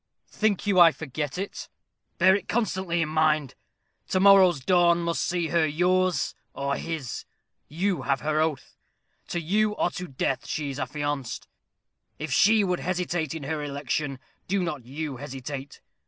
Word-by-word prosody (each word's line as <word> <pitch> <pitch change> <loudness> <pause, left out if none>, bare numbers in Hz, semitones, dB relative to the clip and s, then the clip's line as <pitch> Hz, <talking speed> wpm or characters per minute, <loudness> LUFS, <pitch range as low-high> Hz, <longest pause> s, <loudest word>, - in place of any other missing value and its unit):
"Think 215 -2 0
you 200 -3 +3
I 170 -1 +9
forget 150 0 -5
it?" 195 +2 -5 0.5
"Bear 190 +2 +6
it 200 -2 -4
constantly 190 -6 0
in 155 - -4
mind. 155 -3 +2 0.5
To 185 - +1
morrow's 190 -4 +6
dawn 175 +2 +3
must 170 0 -1
see 175 -2 -1
her 170 0 +3
yours 180 +3 +1 0.2
or 140 0 -1
his. 155 -7 -5 0.4
You 175 +1 -1
have 135 0 0
her 155 0 +1
oath. 155 -4 -3 0.5
To 175 - -2
you 210 +6 +1
or 175 - 0
to 180 - -6
death 135 -1 -2
she 145 -2 -2
is 135 - -6
affianced. 145 -1 -3 0.7
If 155 -3 -4
she 215 +7 +5
should 180 -3 0
hesitate 175 -4 -2
in 160 - -6
her 150 +1 -3
election, 140 0 -2 0.3
do 195 0 +1
not 150 -8 -4
you 140 +1 -5
hesitate. 135 +1 -7
160 Hz, 155 wpm, -26 LUFS, 145-180 Hz, 0.7 s, I